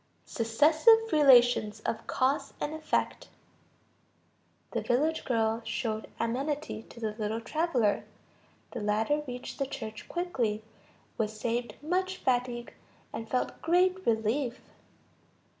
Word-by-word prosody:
Successive 315 - +4
relations 245 -7 +5
of 220 - -3
cause 265 +3 0
and 295 - -2
effect. 310 0 -1 1.4
The - - -1
village 305 +6 +1
girl 225 -2 +1
showed 220 -2 -3
amenity 275 +3 -2
to - - -12
the 220 -2 -2
little 215 +1 -1
traveler. 250 -5 +1 0.7
The - - -5
latter 220 +8 +1
reached 250 +2 -7
the 275 - 0
church 220 -5 -7
quickly, 245 -12 -1 0.6
was 215 -1 -2
saved 235 -1 -2
much 370 +3 0
fatigue, 245 -1 -1 0.4
and 225 0 -6
felt 255 - -1
great 365 +3 +2
relief. 230 +3 +1
245 Hz, 110 wpm, -29 LUFS, 225-305 Hz, 1.4 s, relations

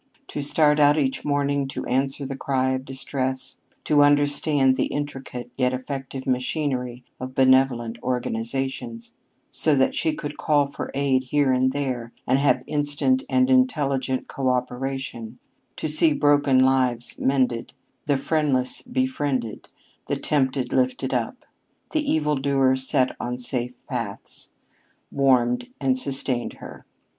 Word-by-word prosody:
To 145 - -4
start 150 +1 +3
out 145 +1 +5
each 135 -3 0
morning 140 -1 0
to 135 - -5
answer 135 +2 0
the 135 0 -4
cry 130 -1 0
of 130 0 -3
distress, 130 0 -3 0.3
to 150 -1 +4
understand 145 -1 +3
the - - 0
intricate 135 -4 -5
yet 125 0 +2
effective 135 0 -5
machinery 125 -1 -2 0.2
of 130 0 -7
benevolent 130 -3 +3
organizations, 125 -1 -3 0.4
so 155 -2 +3
that 135 -1 +2
she 160 - 0
could 145 0 -6
call 145 -2 +3
for 140 - -6
aid 135 -2 +1
here 140 0 +2
and 130 +1 +2
there, 130 -4 -3
and 130 +2 +2
have 130 -3 +2
instant 150 - +1
and 260 0 +3
intelligent 140 - +1
coöperation, 130 -2 -3 0.4
to - - -3
see 155 +1 +5
broken 145 -3 +4
lives 130 -3 +1
mended, 130 -3 0 0.3
the 145 -2 +3
friendless 135 -3 0
befriended, 145 - -2 0.4
the - - -1
tempted 130 -3 0
lifted 255 0 0
up, - - -3 0.5
the 305 -2 0
evil 150 -1 +1
doer 135 -1 +2
set 130 0 +1
on 125 0 -3
safe 125 0 -3
paths, 115 -7 -5 0.6
warmed 125 - +2
and 135 -2 +2
sustained 135 -3 -2
her. - - -12
135 Hz, 130 wpm, -24 LUFS, 130-145 Hz, 0.6 s, out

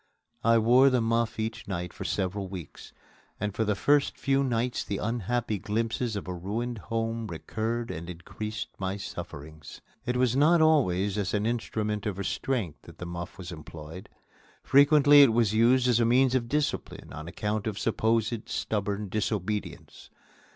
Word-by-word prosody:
I 115 +1 +5
wore 125 +5 +6
the 130 -1 +2
muff 115 0 0
each 110 +1 -4
night 90 -3 -4
for - - -7
several 95 +1 -2
weeks, 90 -5 -9 0.5
and 105 -1 -2
for 110 - 0
the 105 -1 0
first 145 +7 +2
few 135 0 +1
nights 120 -1 -1
the 100 - -3
unhappy 115 0 -1
glimpses 115 +2 -2
of 100 - -5
a 90 - -3
ruined 110 +7 -4
home 115 +1 -3
recurred 115 +6 -3
and 85 +2 -6
increased 105 +5 -6
my 95 0 -2
sufferings. 80 -5 -8 0.3
It 125 0 0
was 125 -1 +2
not 155 +5 +5
always 105 - +3
as 100 0 -1
an 105 +1 0
instrument 110 -2 -2
of 100 -3 -3
restraint 100 - -2
that - - -14
the 90 - -6
muff 85 +1 -6
was 90 -2 -7
employed. 80 +2 -9 0.5
Frequently 145 +1 +7
it 135 -5 +6
was 115 -3 +2
used 120 +3 +4
as 120 -2 +3
a - - +4
means 125 +2 +4
of 120 -3 0
discipline 150 +2 -2
on 80 +3 -7
account 105 +4 -2
of 105 -2 -3
supposed 115 0 0
stubborn 105 -1 -2
disobedience. 105 0 -3
110 Hz, 165 wpm, -28 LUFS, 100-120 Hz, 0.5 s, Frequently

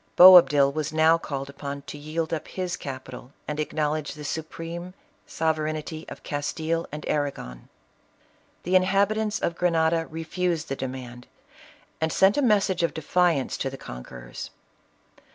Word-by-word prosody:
Boabdil 170 -6 +9
was 155 -1 -2
now 160 +1 +4
called 135 -4 -5
upon 140 0 -7
to - - -8
yield 155 +2 -3
up 160 - -3
his 180 -1 -3
capital, 130 -2 -8
and 150 0 -3
acknowledge 155 0 -1
the 150 - -9
supreme 165 +4 -5 0.3
sovereignty 155 0 -2
of - - -10
Castile 160 +3 -2
and 150 0 -6
Arragon. 135 - -3 0.9
The 180 +2 0
inhabitants 200 +3 +2
of 170 - -1
Grenada 165 -2 +1
refused 165 0 -2
the 135 - -1
demand, 125 -2 -7 0.7
and 160 0 +1
sent 190 +4 +4
a 290 - +2
message 200 -7 +2
of 170 - 0
defiance 160 -2 +1
to 135 - -2
the 135 - -8
con 60 - -8
querors. - - -9
155 Hz, 140 wpm, -25 LUFS, 140-175 Hz, 0.9 s, Boabdil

